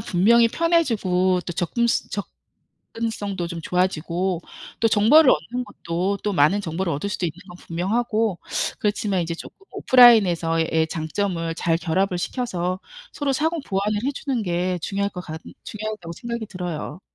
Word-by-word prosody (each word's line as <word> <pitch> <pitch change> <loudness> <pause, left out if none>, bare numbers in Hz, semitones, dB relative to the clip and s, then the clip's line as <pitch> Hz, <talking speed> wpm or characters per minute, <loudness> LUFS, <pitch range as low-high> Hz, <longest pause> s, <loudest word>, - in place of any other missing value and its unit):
분명히 225 +5 +4
편해지고 210 - +2
또 175 - -3
접근 185 +8 0 0.9
접근성도 205 -6 -4
좀 170 -1 -6
좋아지고 180 0 -1 0.4
또 225 - +4
정보를 230 +8 +6
얻는 250 +1 -1
것도 180 -1 -2
또 205 - 0
많은 175 +5 +3
정보를 170 -1 -2
얻을 150 +8 -3
수도 190 -2 -2
있는 165 - -4
건 175 - -11
분명하고 215 +4 -1 0.4
그렇지만 205 -2 0
이제 170 0 -3
조금 - - -11
오프라인에서의 170 -10 +5
장점을 165 +1 -2
잘 165 0 +1
결합을 180 +2 0
시켜서 185 -4 -2 0.3
서로 285 -2 -1
상호 320 +4 0
보완을 205 +2 0
해주는 275 -3 -2
게 180 0 -1
중요할 200 +2 -1
것 180 - -6
같 160 0 -7 0.2
중요하다고 215 -5 -6
생각이 235 +3 -5
들어요. 180 -4 -5
190 Hz, 335 characters per minute, -23 LUFS, 170-225 Hz, 0.9 s, 정보를